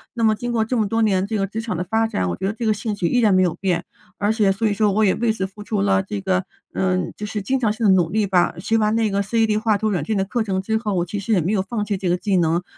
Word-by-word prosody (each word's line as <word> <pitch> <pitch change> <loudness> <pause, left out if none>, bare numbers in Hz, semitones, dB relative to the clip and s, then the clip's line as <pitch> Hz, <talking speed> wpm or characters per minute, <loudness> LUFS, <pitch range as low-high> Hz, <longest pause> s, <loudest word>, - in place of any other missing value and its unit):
那 230 - -1
么 220 -1 +4
经 240 +3 -4
过 225 -2 +1
这 250 - -2
么 215 -3 +1
多 225 +2 +1
年 195 -2 +1
这 220 -1 -2
个 195 - 0
职 220 +3 -5
场 220 -7 -3
的 180 - -1
发 225 +3 +1
展， 90 - -2
我 85 - -2
觉 190 - -3
得 200 - -1
这 230 0 -5
个 215 - +3
兴 210 +1 -3
趣 185 -4 -1
依 245 - +2
然 220 -4 +4
没 185 - +4
有 175 - +1
变， 185 -3 -1 0.3
而 205 +1 +1
且 210 -3 +2
所 220 +4 -2
以 210 - +1
说 210 0 +2
我 215 +1 +2
也 190 - +3
为 235 -1 +1
此 190 - -2
付 195 +2 -11
出 205 -1 -1
了 195 -1 +3
这 195 +1 -5
个， 190 0 0 0.3
嗯， 185 -1 -1
就 210 - -5
是 210 0 -4
经 260 +7 0
常 220 -4 +1
性 225 +1 -2
地 200 - +6
努 175 -3 +3
力 215 +1 +1
吧。 180 -3 +2
学 225 +4 +1
完 215 0 +1
那 225 -2 +1
个 200 0 0
CAD 215 +1 +1
画 215 -2 +2
图 215 +1 -1
软 175 -8 -1
件 215 - -1
的 195 - +1
课 230 +5 -2
程 190 -2 -1
之 220 +3 0
后， 215 -3 -2
我 175 -1 0
其 205 +4 -4
实 215 +3 -1
也 185 - +3
没 170 +5 -1
有 205 -3 +1
放 210 +2 -3
弃 205 -2 -2
这 185 - -3
个 175 - +3
技 195 0 0
能。 170 +1 +1
205 Hz, 370 characters per minute, -21 LUFS, 190-220 Hz, 0.3 s, 地